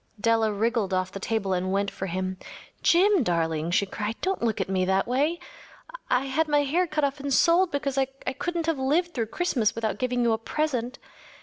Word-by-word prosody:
Della 225 0 +2
wriggled 210 -2 0
off 185 0 -1
the 195 - -6
table 200 -2 -1
and 185 +1 -1
went 200 +1 0
for 190 - -5
him. 185 +1 -3 0.4
“Jim, 380 +1 +4
darling,‚ÄĚ 165 -5 0
she 200 - +3
cried, 210 +3 -4
“don’t 380 +1 -1
look 225 -2 0
at - - -1
me 190 -1 0
that 190 +2 +1
way. 285 +7 +1 0.7
I 250 +2 +2
had 310 +4 0
my 295 -1 +3
hair 340 +6 +1
cut 305 -1 -1
off 280 +1 0
and 280 0 -4
sold 340 +6 +4
because 280 -3 -1
I 270 - +3
couldn’t 275 +6 -4
have 325 -4 0
lived 330 +7 +1
through 230 -3 -2
Christmas 245 -7 0
without 225 -1 -2
giving 250 -1 0
you 235 - +3
a 220 - -1
present. 255 -1 -2
245 Hz, 205 wpm, -26 LUFS, 200-295 Hz, 0.7 s, Jim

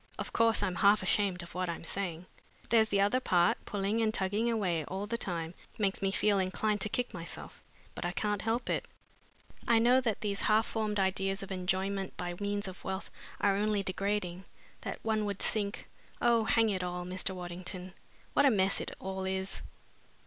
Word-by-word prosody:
Of - - -5
course, 225 -2 +4
I'm 185 -3 -1
half 200 +1 +5
ashamed 185 -2 +1
of 170 - -11
what 180 0 -1
I'm 170 - -4
saying. 175 -1 -3 0.4
There's 220 -1 +5
the 200 - +2
other 205 +6 +3
part 175 -7 +2
pulling 205 +2 0
and 220 -1 +2
tugging 210 +3 0
away 185 -8 0
all 190 +5 -4
the 230 +3 -2
time 170 -7 -2 0.2
makes 200 -3 0
me 195 - +2
feel 200 +1 +2
inclined 205 +3 0
to 215 - +2
kick 245 +3 -1
myself, 170 -1 -8 0.3
but - - -6
I 175 - 0
can't 210 +1 -1
help 225 +2 -1
it. - - -1 0.8
I 235 -2 +5
know 245 +3 +5
that 225 -5 -1
these 200 -2 0
half 215 +1 +4
formed 215 -2 -1
ideas 195 0 +1
of 195 - -8
enjoyment 190 +1 -1
by 175 -1 -3
means 205 0 -2
of 185 -1 -9
wealth 190 0 -4 0.3
are 200 -1 +4
only 205 0 +1
degrading, 190 -1 -2 0.4
that - - -4
one 220 -1 +1
would 200 -1 -1
sink 205 -2 0 0.3
oh, 235 -2 +4
hang 225 0 +4
it 190 -3 -1
all, 180 0 -3
Mr. 185 +1 -2
Waddington, 180 +1 -6 0.4
what - - +5
a - - +7
mess 195 -5 +2
it - - -6
all 190 0 -4
is!" 190 0 -2
195 Hz, 190 wpm, -32 LUFS, 185-215 Hz, 0.8 s, a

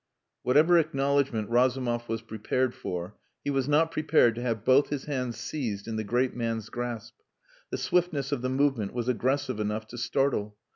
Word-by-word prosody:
Whatever 155 +7 +5
acknowledgment 140 -7 +1
Razumov 120 -1 +1
was 115 0 -2
prepared 115 +3 -1
for, 90 +2 -6 0.2
he 145 - -1
was 135 -1 0
not 160 +2 +3
prepared 155 -7 +3
to 120 - -6
have 115 -3 -2
both 130 +2 +5
his 145 -2 -3
hands 125 -5 -3
seized 115 -5 -4
in 115 - -3
the 110 - -1
great 125 +4 0
man's 115 -3 -2
grasp. 120 -3 -5 0.6
The - - -3
swiftness 165 -6 0
of 140 -4 -1
the 130 - -1
movement 130 -6 +1
was 120 -1 -2
aggressive 130 0 0
enough 105 +1 -2
to 120 - -7
startle. 115 -6 0
125 Hz, 175 wpm, -28 LUFS, 115-140 Hz, 0.6 s, Whatever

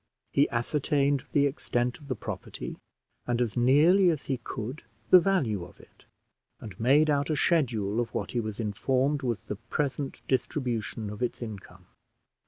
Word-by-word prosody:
He 140 - +3
ascertained 140 +3 +1
the 145 -1 +3
extent 120 -3 -1
of 145 - -14
the 130 - -2
property, 105 - -6 0.5
and 120 -1 0
as 120 -4 0
nearly 155 +10 +5
as 155 -4 -1
he 135 - -2
could 125 +3 -6 0.3
the 185 - +10
value 145 - +1
of 85 - -13
it; - - -20 0.5
and 105 -5 -10
made 140 +7 +4
out 145 -1 +1
a 155 - +1
schedule 120 - +1
of 120 - -1
what - - -3
he 120 - -1
was 110 -1 -4
informed 130 +7 0
was 120 -4 -2
the 105 - -6
present 135 +4 -3
distribution 120 -5 -2
of 105 - -8
its 125 - -1
income. 95 -5 -9
125 Hz, 165 wpm, -28 LUFS, 110-145 Hz, 0.5 s, the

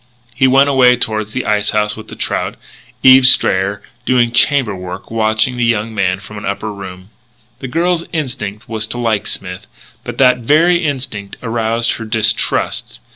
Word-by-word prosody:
He 130 +3 +2
went 135 +2 +4
away 130 -3 +5
toward 110 -3 -2
the 120 +4 -5
ice 105 -1 +1
house 105 0 0
with 110 - -11
the - - -10
trout. - - -3 0.5
Eve 130 0 +8
Strayer, 100 -4 +2 0.2
doing 125 -2 +2
chamber 120 -4 +2
work, 90 +2 -8
watched 110 -1 +2
the 125 -1 -3
young 115 -1 0
man 95 -3 0
from 105 +1 -10
an - - -11
upper 105 +2 -4
room. 95 0 -10 0.5
The 135 - -6
girl's 170 +4 0
instinct 125 -9 -4
was 110 -1 -3
to 120 - -4
like 115 -4 -1
Smith, 95 +2 -6 0.4
but - - -7
that 125 -1 +4
very 165 +8 +3
instinct 130 -9 -4
aroused 115 0 0
her 115 - -7
distrust. 110 -1 0
115 Hz, 170 wpm, -15 LUFS, 105-130 Hz, 0.5 s, Eve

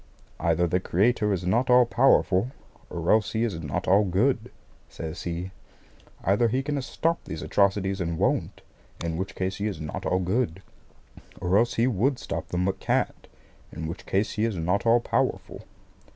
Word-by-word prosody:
"Either 85 +1 +2
the 90 +2 +1
Creator 105 +4 +1
is 95 -2 -1
not 120 +8 +1
all 125 0 +7
powerful, 120 -4 +3 0.4
or 85 0 -1
else 110 -1 +3
He 110 +1 +1
is 100 -8 -2
not 70 -3 -3
all 100 +3 +5
good," 110 +5 +1 0.4
says 80 +1 -6
he. 90 +2 -4 0.7
"Either 100 +5 +3
He 130 +4 0
can 145 0 -2
stop 165 +5 -1
these 80 - -6
atrocities 100 -1 +1
and 85 -2 -2
won't, - - 0 0.4
in 80 -1 -2
which 95 +4 -4
case 95 0 -2
He 105 - -1
is 100 -7 -4
not 75 -2 -5
all 90 - +2
good; 95 -1 -1 0.8
or 90 +1 0
else 120 +3 +3
He 115 - +3
would 125 +3 +1
stop - - -5
them 90 +1 -1
but 95 0 -1
can't, - - -1 0.4
in 80 - -6
which 85 +3 -7
case 100 +2 +1
He 105 - -2
is 115 -3 0
not 90 +6 0
all 115 +1 +5
powerful." - - -2
100 Hz, 180 wpm, -26 LUFS, 90-115 Hz, 0.8 s, all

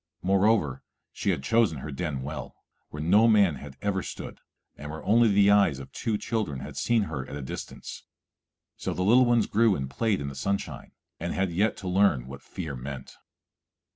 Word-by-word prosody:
Moreover, 95 - +2 0.3
she - - -2
had 65 - 0
chosen 110 -2 +2
her 75 +3 -6
den 70 -2 -3
well, 70 -1 -6 0.3
where 75 0 -6
no 105 +7 +5
man 100 -9 +4
had 70 0 -11
ever 100 -2 0
stood, - - -7 0.4
and 75 - -8
where 80 +1 -7
only 115 +2 +5
the 100 -1 +5
eyes 100 -9 +4
of 70 - -10
two 110 -2 -2
children 105 - -2
had - - -8
seen 115 -2 +2
her 75 -8 -4
at - - -7
a 75 - -5
distance. 65 - -7 0.7
So - - -3
the 90 - -1
little 120 +6 +6
ones 120 -2 +3
grew 110 -1 +3
and 65 -4 -3
played 105 - 0
in 70 - -4
the 70 - -5
sunshine, 100 +9 -3 0.3
and 85 +1 -3
had 95 -1 0
yet 100 +6 +1
to 95 - -7
learn 90 -9 +3
what 70 +1 -9
fear 75 -3 -6
meant. 65 +1 -7
90 Hz, 195 wpm, -27 LUFS, 70-105 Hz, 0.7 s, little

